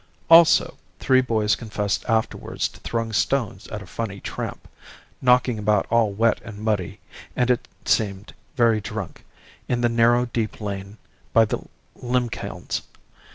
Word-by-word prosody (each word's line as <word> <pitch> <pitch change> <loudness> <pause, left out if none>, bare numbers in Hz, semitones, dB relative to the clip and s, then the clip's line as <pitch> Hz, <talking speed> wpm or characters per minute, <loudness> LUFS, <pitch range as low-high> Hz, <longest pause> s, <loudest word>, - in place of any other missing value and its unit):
Also 165 0 +6 0.2
three 130 -1 +4
boys 110 -4 +1
confessed 105 -3 -2
afterwards 110 0 -1
to - - -16
throwing 115 -1 -3
stones 110 -5 0
at 105 -2 -6
a - - -12
funny 100 +1 -5
tramp, - - -6 0.5
knocking 125 -2 +3
about 105 -1 +2
all 115 -3 +3
wet 115 +3 +1
and 105 -2 -9
muddy, 105 -2 -2 0.4
and, 125 0 +2
it 125 - -1 0.2
seemed, 100 -2 0 0.2
very 115 -3 +3
drunk, 105 -2 -6 0.4
in 120 -1 0
the 120 - +3
narrow 120 +1 +3
deep 115 -2 -3
lane 100 0 -6 0.4
by 115 -1 +6
the - - -2 0.4
limekilns. 125 -1 -3
115 Hz, 140 wpm, -23 LUFS, 105-120 Hz, 0.5 s, Also